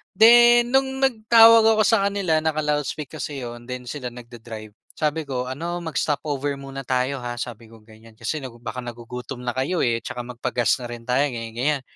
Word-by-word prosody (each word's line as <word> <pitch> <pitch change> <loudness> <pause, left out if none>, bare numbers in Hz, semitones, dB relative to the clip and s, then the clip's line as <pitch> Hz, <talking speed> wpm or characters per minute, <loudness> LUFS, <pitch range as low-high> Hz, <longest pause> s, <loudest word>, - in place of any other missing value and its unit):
Then 240 +1 +7
nung 265 0 +1
nagtawag 230 -3 +6
ako 220 -1 +4
sa 220 -3 +3
kanila 180 -6 +1
naka-loudspeak 150 -2 -2
kase 145 -1 -5
'yon 120 0 -8
then 125 0 -6
sila 135 -2 -5
nagda-drive, 115 -3 -10 0.2
sabi 155 0 -1
ko, 125 -2 -2
"Ano, 170 +6 -4
mag-stop 150 -3 -1
over 145 -1 -2
muna 135 -1 -8
tayo, 130 +2 0
ha?" 120 0 -4
Sabi 115 -2 -7
kong 110 -1 -17
ganyan, 110 +1 -16
"Kasi 120 +7 -3 0.3
baka 120 +2 -5
nagugutom 120 +1 -7
na 125 - -1
kayo, 155 +7 0
eh, 115 -1 +1
at - - -28
saka 125 - -5
magpa-gas 120 -2 0
na 120 - -6
rin 120 -1 -8
tayo 130 +3 +2
ganyan, 115 -1 -6
ganyan." 140 +2 0
135 Hz, 185 wpm, -23 LUFS, 120-165 Hz, 0.3 s, Then